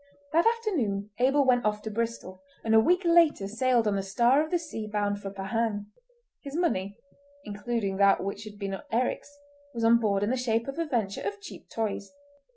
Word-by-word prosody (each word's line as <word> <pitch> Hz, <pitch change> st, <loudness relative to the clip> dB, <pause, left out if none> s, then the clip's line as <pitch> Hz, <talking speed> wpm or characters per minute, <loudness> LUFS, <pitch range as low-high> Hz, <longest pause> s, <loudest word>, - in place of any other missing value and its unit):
That 335 Hz, +6 st, +4 dB
afternoon 275 Hz, -, -1 dB
Abel 270 Hz, +3 st, +3 dB
went 245 Hz, -1 st, +3 dB
off 210 Hz, 0 st, -1 dB
to 220 Hz, -, -4 dB
Bristol, 225 Hz, -4 st, -4 dB, 0.2 s
and 220 Hz, -, +1 dB
a 220 Hz, -, +8 dB
week 360 Hz, -, +3 dB
later 335 Hz, -, +4 dB
sailed 235 Hz, +1 st, +1 dB
on 205 Hz, -, +1 dB
the -, -, 0 dB
Star 235 Hz, +9 st, +3 dB
of 315 Hz, -, -6 dB
the 350 Hz, -, +2 dB
Sea 305 Hz, -10 st, -6 dB
bound 205 Hz, -1 st, -1 dB
for 195 Hz, -, -5 dB
Pahang. 205 Hz, +1 st, -2 dB, 0.5 s
His 280 Hz, 0 st, -8 dB
money—including 235 Hz, -, -3 dB
that 200 Hz, -1 st, +4 dB
which 200 Hz, +2 st, -4 dB
had 210 Hz, -1 st, -10 dB
been 195 Hz, -1 st, -4 dB
Eric's—was 285 Hz, +1 st, -4 dB
on 230 Hz, +1 st, +6 dB
board 200 Hz, -3 st, +1 dB
in 210 Hz, -, 0 dB
the 260 Hz, -, 0 dB
shape 230 Hz, -1 st, 0 dB
of 275 Hz, +4 st, -5 dB
a 335 Hz, -, 0 dB
venture 220 Hz, -8 st, -1 dB
of 415 Hz, 0 st, -4 dB
cheap 405 Hz, -, -11 dB
toys. 210 Hz, -3 st, -3 dB
230 Hz, 185 wpm, -28 LUFS, 205-285 Hz, 0.5 s, a